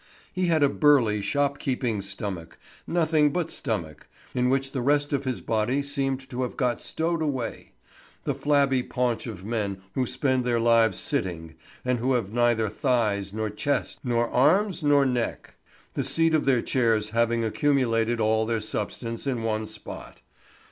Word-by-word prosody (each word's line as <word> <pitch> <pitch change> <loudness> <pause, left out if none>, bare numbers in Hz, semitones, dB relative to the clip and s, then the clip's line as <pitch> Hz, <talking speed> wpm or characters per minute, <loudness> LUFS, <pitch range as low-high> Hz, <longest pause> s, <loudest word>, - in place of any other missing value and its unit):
He 185 0 0
had 160 -3 +3
a - - +6
burly 130 -8 +3
shop 145 +5 0
keeping 125 -6 -1
stomach—nothing 120 - -1
but 170 +1 -2
stomach—in 110 - -3
which 135 0 0
the 130 - -2
rest 145 +3 +1
of 140 0 -1
his 130 -2 -2
body 115 +6 0
seemed 135 -2 -2
to 125 0 -3
have 125 - -3
got 125 -2 0
stowed 165 +1 -1
away; 135 -6 -3 0.5
the - - 0
flabby 140 -3 +2
paunch 125 -1 -1
of 100 -5 -7
men 100 -4 -3
who 130 -2 0
spend 130 -3 0
their 120 -1 +1
lives 115 -3 +4
sitting, 85 - -2 0.3
and 125 -1 +1
who 130 +3 +1
have 110 -5 -1
neither 120 -2 +2
thighs, 105 -4 0
nor 110 0 -3
chest, 140 +7 -2
nor 120 -2 +1
arms, 180 +9 +3
nor 145 -2 +4
neck; 125 -3 -2 0.4
the - - -1
seat 165 0 +2
of 155 - +2
their 130 -4 +3
chairs 115 -4 +1
having 115 0 +1
accumulated 115 -2 +1
all 110 0 +2
their 115 -1 0
substance 115 +3 -4
in 125 -4 -1
one 110 -1 -1
spot. - - -10
125 Hz, 160 wpm, -26 LUFS, 110-140 Hz, 0.5 s, a